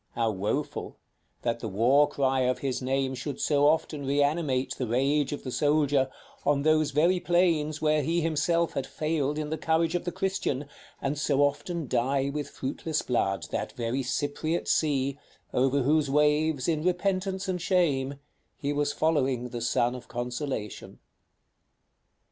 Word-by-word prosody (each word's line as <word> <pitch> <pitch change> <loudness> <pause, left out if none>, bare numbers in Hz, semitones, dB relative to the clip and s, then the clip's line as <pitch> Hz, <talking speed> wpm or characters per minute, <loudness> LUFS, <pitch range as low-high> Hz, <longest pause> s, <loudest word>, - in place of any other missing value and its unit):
how 115 -1 +1
woful, 100 +1 -3 0.5
that 115 -1 0
the 115 - -4
war 125 +9 +4
cry 135 -2 +1
of 125 0 +1
his 130 0 -2
name 130 +1 0
should 135 +2 -5
so 145 -1 +3
often 155 -1 +1
reanimate 140 -1 +1
the 125 - -1
rage 135 +5 +1
of 145 - -5
the 130 - -5
soldier, 145 -2 +2 0.3
on 140 -1 +2
those 155 -1 +3
very 165 +6 +3
plains 165 -4 +1
where 155 0 +3
he 165 +3 0
himself 165 +1 +1
had 135 - -3
failed 150 -2 -1
in 150 -1 -3
the 160 - -2
courage 160 +1 +1
of 175 - -1
the 175 - -3
Christian, 190 -8 -2 0.4
and 140 +2 -1
so 145 -1 +2
often 145 +4 -1
dye 135 +3 +1
with 150 -1 -3
fruitless 150 +4 -3
blood 100 -6 0
that - - -3
very 120 +3 -2
Cypriot 145 +6 -2
Sea, 140 -2 +1 0.3
over 135 +2 +2
whose 150 +1 +2
waves, 150 -1 +2
in 160 -3 +1
repentance 190 +1 0
and 180 -2 -2
shame, 145 -7 +1 0.4
he 145 0 -2
was 145 0 0
following 135 -5 0
the 120 -1 -5
Son 120 +1 +1
of 125 - -9
Consolation! 120 -3 -4
145 Hz, 155 wpm, -28 LUFS, 130-155 Hz, 0.5 s, war